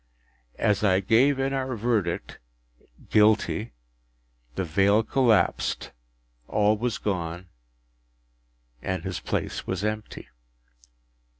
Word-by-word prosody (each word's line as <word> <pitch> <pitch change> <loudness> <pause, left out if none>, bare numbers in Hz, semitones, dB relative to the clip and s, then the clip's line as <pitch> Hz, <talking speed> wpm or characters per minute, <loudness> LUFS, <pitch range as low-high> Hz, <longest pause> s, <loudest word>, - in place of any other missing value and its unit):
As 105 0 +1
I 95 -2 +4
gave 120 +8 +3
in 135 +1 -1
our 130 -2 -2
verdict, 110 -6 -1 0.7
“Guilty,” 110 +1 +3 0.8
the - - -1
veil 100 +6 +3
collapsed, 115 -4 +1 0.6
all 105 0 +2
was 115 +1 -2
gone, 90 -2 -3 1.3
and 95 -2 -3
his 95 -1 -4
place - - -3
was 95 +1 -2
empty. 105 0 -4
105 Hz, 95 wpm, -26 LUFS, 95-115 Hz, 1.3 s, I